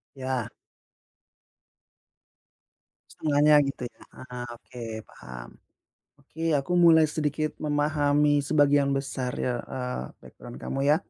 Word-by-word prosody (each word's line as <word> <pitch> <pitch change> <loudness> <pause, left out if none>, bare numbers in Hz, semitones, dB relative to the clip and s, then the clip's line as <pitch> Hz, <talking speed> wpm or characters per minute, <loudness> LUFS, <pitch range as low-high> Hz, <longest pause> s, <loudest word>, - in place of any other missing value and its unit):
Ya. 130 -3 -2 2.6
Setengahnya 150 0 +4
gitu 130 -2 -6
ya, 120 - -11 0.2
ah, 125 -1 -6
oke, 120 +1 -11 0.2
paham. 60 -1 -11 0.7
Oke, 160 +4 -4
aku 145 +3 0
mulai 165 -2 +7
sedikit 150 0 -2
memahami 145 -1 +2
sebagian 145 -1 +3
besar 135 -2 -3
ya, 125 -1 -1
eee, 125 - -3 0.2
background 120 0 -12
kamu 135 - -3
ya. 150 - +6
145 Hz, 105 wpm, -27 LUFS, 125-150 Hz, 2.6 s, mulai